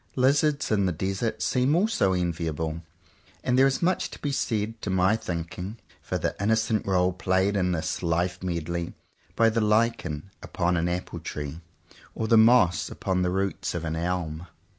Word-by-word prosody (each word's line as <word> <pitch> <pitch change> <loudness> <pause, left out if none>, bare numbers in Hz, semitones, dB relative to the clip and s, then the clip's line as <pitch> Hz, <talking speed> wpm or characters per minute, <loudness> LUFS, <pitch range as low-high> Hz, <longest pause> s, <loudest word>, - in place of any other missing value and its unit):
Lizards 140 +2 +2
in 100 -3 +2
the - - +1
desert 95 +6 -2
seem 130 +4 +2
also 180 - +2
enviable; 85 -2 -2 0.6
and 125 - +1
there 135 +1 +6
is 135 +4 -1
much 180 +2 +1
to - - -10
be 145 - -3
said, 110 -4 -2
to - - -4
my 95 +2 +3
thinking, 90 +2 -5 0.2
for - - -3
the - - -2
innocent 110 0 +1
role 90 -1 +2
played 95 +2 +1
in 90 -2 +1
this 80 -2 -2
life 90 +1 0
medley 85 -1 -3 0.4
by 115 - +4
the 115 0 +1
lichen 105 -6 0
upon 90 0 -1
an 85 +1 0
apple 90 +1 -4
tree, 75 +2 -6 0.5
or 110 - -2
the 115 - +5
moss 110 -5 +5
upon 95 -1 -1
the 90 - +1
roots 95 0 -2
of 85 -1 -3
an 80 0 -2
elm. 85 -1 -3
95 Hz, 170 wpm, -26 LUFS, 85-110 Hz, 0.6 s, there